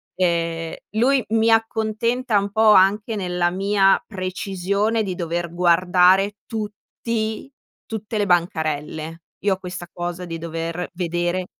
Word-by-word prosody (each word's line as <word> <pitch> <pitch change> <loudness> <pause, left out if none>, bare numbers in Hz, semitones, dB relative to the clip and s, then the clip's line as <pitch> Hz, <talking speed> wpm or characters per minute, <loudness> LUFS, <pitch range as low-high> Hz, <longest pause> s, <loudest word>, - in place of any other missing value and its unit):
Ehm, 170 -2 -1 0.2
lui 260 +3 +3
mi 225 +1 +3
accontenta 225 +1 +1
un 200 0 -3
po' 220 +1 +5
anche 205 +3 +3
nella 180 -3 0
mia 195 +1 +3
precisione 195 +3 -1
di 190 -3 -3
dover 170 -1 -3
guardare 180 +3 +4
tutti 220 +1 -4 0.4
tutte 220 0 -5
le 205 - +2
bancarelle. 160 -3 -1 0.2
Io 200 -1 +3
ho - - -16
questa 180 -1 -7
cosa 175 0 -5
di 165 -1 -5
dover 165 +1 -4
vedere 175 +1 -1
185 Hz, 125 wpm, -22 LUFS, 175-215 Hz, 0.4 s, po